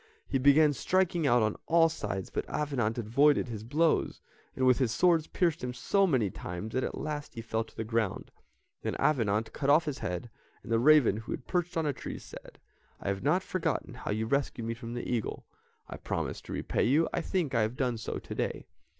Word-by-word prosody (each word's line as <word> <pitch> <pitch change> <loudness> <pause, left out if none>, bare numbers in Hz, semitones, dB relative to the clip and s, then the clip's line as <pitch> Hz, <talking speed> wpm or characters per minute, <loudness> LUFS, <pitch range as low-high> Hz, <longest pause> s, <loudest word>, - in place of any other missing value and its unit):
He 135 - 0
began 145 +3 +5
striking 175 +1 +1
out 120 -3 +4
on 110 0 0
all 165 0 +5
sides, 100 - -4
but - - -3
Avenant 130 -7 -1
avoided 125 +4 +3
his 110 -2 -6
blows, 155 +7 +1 0.4
and 130 - +1
with 130 0 +5
his 125 -4 +1
sword 165 +4 +3
pierced 170 -5 +1
him 125 0 -3
so 195 +10 +2
many 120 - +1
times 90 +7 -6
that 130 - 0
at - - -3
last 150 -1 -5
he 115 - -5
fell 110 0 -1
to 110 - -20
the 110 - -2
ground. 110 -3 -2 0.5
Then - - -2
Avenant 110 -7 +1
cut 140 -1 -1
off 155 +4 +5
his 145 -3 -3
head, 90 +6 -4 0.3
and - - -8
the 115 - +3
raven, 140 -5 +5
who 115 - -7
had - - -7
perched 180 -1 -1
on 160 - +1
a 145 - +1
tree, - - -6
said, - - -12 0.4
"I - - -3
have 100 -1 -2
not 175 +7 +2
forgotten 185 -4 -2
how - - -7
you 110 +2 0
rescued 125 -1 -1
me 115 - -1
from 115 0 -7
the 120 - -4
eagle; 120 -3 -2 0.4
I - - -7
promised - - -4
to - - -6
repay - - 0
you, 150 +7 +3
I - - 0
think 165 -5 -1
I 115 - +3
have 110 +4 -1
done 125 -3 0
so - - -4
to - - -7
day." - - -3
130 Hz, 220 wpm, -30 LUFS, 115-155 Hz, 0.5 s, began